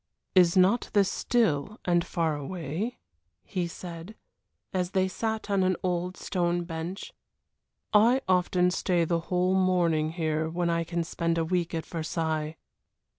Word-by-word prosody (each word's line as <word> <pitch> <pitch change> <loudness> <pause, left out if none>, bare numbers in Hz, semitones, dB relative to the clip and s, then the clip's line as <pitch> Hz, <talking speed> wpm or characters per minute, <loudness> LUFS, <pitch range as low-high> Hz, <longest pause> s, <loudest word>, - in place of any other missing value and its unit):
"Is 180 -1 +5
not 190 +6 +4
this 200 -2 +3
still 215 -4 +1
and 175 -1 +3
far 165 -3 -1
away?" 165 - -4 0.5
he 180 -4 -2
said, 170 +3 -8 0.6
as 180 -2 0
they 190 -1 +2
sat 220 +3 -3
on 200 -2 +2
an 185 0 +2
old 180 0 -1
stone 175 -1 -1
bench. 170 +3 -6 0.8
"I 235 +5 +5
often 180 -1 +3
stay 180 -2 +1
the 170 +1 +1
whole 180 +1 +2
morning 170 -4 +2
here 160 -2 -1
when 170 +1 0
I 170 0 +1 0.2
spend 170 0 -1
a 165 - +1
week 175 0 -1
at 160 - -3
Versailles." 160 -1 -2
175 Hz, 140 wpm, -28 LUFS, 165-185 Hz, 0.8 s, Is